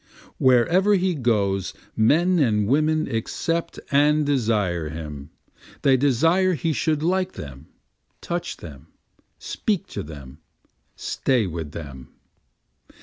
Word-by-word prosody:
Wherever 170 - +4
he 185 -1 +1
goes 100 - 0 0.2
men 165 +11 +3
and 105 -7 +2
women 155 +4 +2
accept 165 +8 -2
and 150 +2 +3
desire 105 - 0
him, 75 -2 -7 0.5
They 135 - +5
desire 165 +8 +3
he 160 +3 -1
should 155 +1 0
like 185 +2 0
them, 70 0 -9 0.5
touch 175 0 -4
them, 75 -6 -11 0.5
speak 200 -3 -2
to - - -5
them, 70 -2 -10 0.6
stay 125 -5 0
with 80 -4 -5
them. 70 -5 -9
130 Hz, 110 wpm, -23 LUFS, -, 0.6 s, They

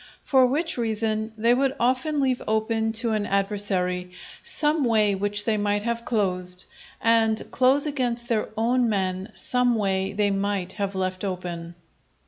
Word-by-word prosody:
For 260 -2 +4
which 305 +2 -1
reason, 220 -1 -1
they 230 +2 +3
would 270 +1 +1
often 260 +5 +1
leave 260 -2 +1
open 220 +1 0
to 230 +1 +1
an 215 -1 -1
adversary 190 -3 -1 0.3
some 300 -1 +1
way 215 -4 +3
which 205 +1 0
they 220 -2 +1
might 205 0 0
have 235 0 -2
closed, 180 -5 -1 0.3
and 225 -1 +3
close 270 +2 +3
against 245 -5 -1
their 225 -3 0
own 240 +2 +2
men 190 0 -2
some 250 -1 +1
way 195 -2 0
they 205 0 +1
might 195 -2 -1
have 200 -2 -3
left 185 0 -2
open. 175 -3 -5
220 Hz, 150 wpm, -25 LUFS, 195-240 Hz, 0.3 s, For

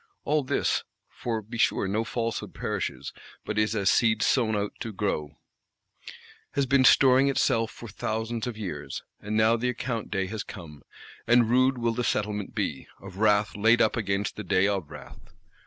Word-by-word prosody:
All 150 0 +2
this 130 - 0 0.3
(for 115 -3 -4
be 115 +3 -8
sure 95 - +2
no 105 +4 0
falsehood 115 0 -3
perishes, - - -4 0.3
but 105 0 -2
is 110 +1 +1
as 100 -2 +2
seed 110 -2 +3
sown 115 -5 +2
out 105 0 -2
to 115 - -5
grow) 75 -8 -3 1.2
has 140 - +1
been 135 +1 +3
storing 130 +1 +6
itself 115 -4 +1
for 115 - -10
thousands 110 +3 -3
of 120 -3 -5
years; 105 -5 -5 0.2
and 105 +1 -3
now 110 +1 +4
the 125 +2 -1
account 120 -2 -3
day 95 -2 -1
has 105 +2 -4
come. 75 -6 -10 0.5
And 120 -1 +4
rude 130 +1 +3
will 115 -1 0
the 125 +2 -2
settlement 105 -3 -2
be: - - -3
of 95 -1 -11
wrath 105 -1 +2
laid 115 +3 +4
up 110 - +3
against 100 -3 -2
the 105 - -5
day 95 +1 +2
of 95 -7 -2
wrath. - - -13
110 Hz, 175 wpm, -27 LUFS, 105-120 Hz, 1.2 s, storing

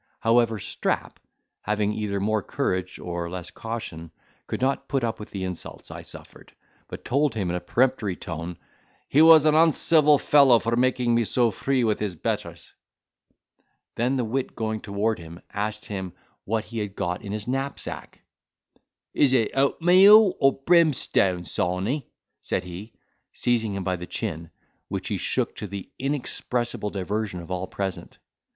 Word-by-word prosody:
However, 115 -1 +3
Strap, - - -3 0.4
having 105 0 0
either 105 -2 -2
more 110 +2 0
courage 90 0 -2
or 85 -1 -4
less 90 -1 -5
caution, 110 -8 -6 0.4
could - - -3
not 135 +2 0
put 135 -2 -1
up 115 -1 -2
with 105 - -8
the 95 -2 -5
insults 90 -2 -7
I - - -7
suffered, - - -10 0.3
but - - -9
told 140 -1 +1
him 95 -5 -1
in - - -2
a - - -1
peremptory 115 0 0
tone, 85 0 -6 0.5
"He 145 - +4
was 160 -1 +8
an 155 - +5
uncivil 155 -1 +5
fellow 140 -4 +5
for 115 +1 -1
making 120 -1 +2
so 115 +3 +2
free 130 +5 0
with 110 -2 +1
his 105 -4 -2
betters." - - -4 1.2
Then 125 +3 0
the 125 - 0
wit 130 +4 -3
going 110 -1 -3
toward 105 +1 -1
him, 85 +1 -10
asked 105 +1 -3
him 95 -3 -5 0.3
what 110 +1 -1
he 115 - -6
had 105 -2 -4
got 90 -2 -2
in 100 - -7
his 105 +1 -4
knapsack? 135 +2 -4 0.9
"Is 135 -3 +3
it 115 -4 +2
oatmeal 185 +9 +6
or 135 0 +4
brimstone, 140 - +3
Sawney?" 95 - -2 0.3
said - - -2
he, 90 +5 -9 0.4
seizing 115 -4 0
him 100 - -3
by 90 -1 -1
the 90 +1 -8
chin, 85 -7 -4 0.4
which - - -4
he - - -1
shook, - - -1
to 105 - -5
the 100 0 -8
inexpressible 125 -5 -2
diversion 100 0 -3
of 85 +1 -10
all 90 0 -2
present. 95 -1 -5
110 Hz, 160 wpm, -25 LUFS, 95-130 Hz, 1.2 s, was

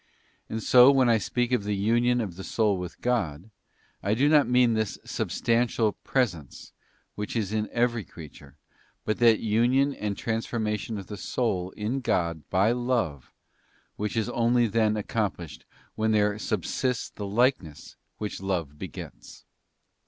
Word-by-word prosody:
And 110 -1 -4
so 125 +1 +7
when 135 -3 +4
I 115 -1 +4
speak 120 +4 -1
of 125 -5 +1
the 105 0 -1
union 120 +4 +2
of 95 -6 -5
the 95 - -8
soul 105 -1 +1
with 90 -2 -7
God, 105 -6 -1 0.5
I 105 +2 0
do 135 +5 +3
not 150 -3 +4
mean 125 -1 +4
this 110 -2 -1
substantial 115 -2 0
pre 130 +5 +1
sence 85 - -11 0.4
which 105 -1 -5
is 105 -3 -1
in 110 -1 -1
every 120 -2 0
creature, 80 -4 -13 0.5
but 110 - -1
that 115 -2 +5
union 120 +6 +2
and 105 -4 -4
trans 115 -2 -2
formation 110 -1 -2
of 100 - -7
the 105 - -8
soul 95 -8 -1
in 110 +6 -2
God 85 - -1
by 100 +4 +3
love 120 - -1 0.6
which 105 +1 -3
is 110 - 0
only 120 0 +2
then 110 0 +1
accomplished 100 -7 -3 0.3
when 110 0 0
there 105 0 +2
subsists 110 +5 -2
the 100 - -6
likeness 105 - 0 0.2
which 105 -3 -5
love 85 -7 -3
begets. - - -9
110 Hz, 155 wpm, -26 LUFS, 100-120 Hz, 0.6 s, so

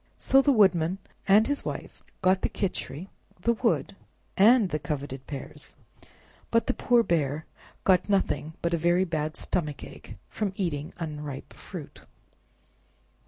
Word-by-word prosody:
So 270 - +5
the 280 - +4
Woodrnan 190 -6 +4 0.3
and 205 +3 +6
his 285 0 -2
Wife - - -6 0.2
got 185 +1 +4
the - - 0
Khichri, 180 -3 -3 0.3
the 235 +6 +2
wood, 230 -4 0 0.4
and 220 0 +6
the 155 - -1
coveted 140 -3 -5
pears, 140 -2 -8 0.7
but 230 0 +2
the - - +1
poor 240 -1 +3
bear 155 -4 0 0.4
got 185 +1 +3
nothing 190 -5 0
but 170 0 +1
a - - +3
very 175 +3 +3
bad 155 -2 -2
stomachache 145 -4 -4
from 205 -3 -3
eating 155 -7 -2
unripe 150 -4 -6
fruit. - - -9
175 Hz, 135 wpm, -27 LUFS, 150-205 Hz, 0.7 s, and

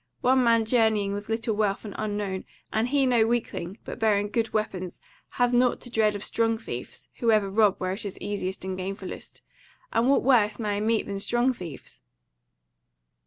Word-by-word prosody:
One 260 0 +4
man 230 -1 +4
journeying 220 -4 +2
with 205 +1 -6
little 225 -1 -1
wealth, 205 0 0
and 205 - -6
unknown, 205 -3 -3 0.3
and 220 +2 +1
he 275 +1 +2
no 235 -3 +3
weakling, 220 -5 -2
but - - -7
bearing 210 -2 +2
good 225 +1 -1
weapons, 190 -4 -3 0.3
hath 245 0 +1
nought 245 0 +3
to 245 - -8
dread 215 -2 +2
of 205 - -5
strong 225 0 0
thieves, 125 - -8
who 235 - +1
ever 210 -3 +3
rob 210 -1 +4
where 185 -1 -2
it 195 +3 -2
is 200 -2 -5
easiest 190 -2 -4
and 190 0 -3
gainfullest. 195 +1 -7 0.5
And 235 +3 +3
what 275 - +4
worse 230 -5 +4
may 210 -3 -1
I - - -1
meet 220 +1 +1
than 200 -1 -4
strong 240 +5 +1
thieves?" 165 - -10
215 Hz, 185 wpm, -26 LUFS, 200-230 Hz, 0.5 s, One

